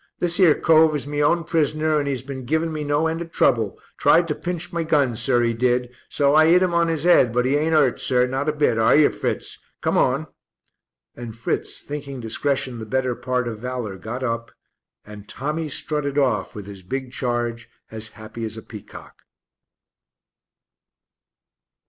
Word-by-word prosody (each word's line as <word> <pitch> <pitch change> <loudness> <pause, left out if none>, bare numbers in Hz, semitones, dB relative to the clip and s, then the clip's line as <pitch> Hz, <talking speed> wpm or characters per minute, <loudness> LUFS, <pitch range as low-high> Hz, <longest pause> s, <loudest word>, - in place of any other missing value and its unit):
This 175 +1 +2
'ere 170 -6 +6
cove 160 -1 +4
is 145 - -2
my 145 0 -4
own 170 +3 +2
prisoner 155 -1 +1
and 145 - -2
'e's 130 -3 -3
been 135 -1 -7
giving 160 +5 -1
me 155 -1 -3
no 145 +2 +1
end 165 +1 -1
of 165 -1 -7
trouble, 115 -10 +1 0.2
tried 170 +1 +4
to - - +1
pinch 175 +1 -5
my 170 - -1
gun, 145 -6 +1
sir, 120 +1 +2
'e 115 0 +1
did, 125 +1 0 0.2
so 140 -1 +2
I 155 +1 +6
'it 175 +3 +5
'im 180 -2 0
on 170 -1 +2
'is 160 -2 -2
head, 170 -9 +5
but 125 +2 +1
'e 135 +2 +2
ain't 160 +2 +1
'urt, 140 -5 +3
sir, 125 -1 +2
not 135 +4 -2
a - - +3
bit, 145 -6 +1
are 110 - +4
yer, 150 -1 +5
Fritz? - - -4 0.2
Come - - +1
on." - - +1 0.9
And 120 -2 -8
Fritz, 115 - -3
thinking 140 -2 -6
discretion 125 +1 -2
the 110 - -7
better 130 +2 0
part 125 0 -2
of 110 -2 -5
valour, 120 -5 -5
got 120 +5 -6
up, 115 -1 -2 0.6
and 105 -1 -12
Tommy 150 +3 -3
strutted 145 -1 -2
off 125 -9 0
with 105 -2 -7
his 100 -1 -10
big 130 +7 -5
charge 120 -2 -2 0.2
as 110 0 -6
happy 110 +1 -8
as 110 0 -5
a 110 - -8
peacock. 105 -3 -12
135 Hz, 185 wpm, -22 LUFS, 120-155 Hz, 0.9 s, ere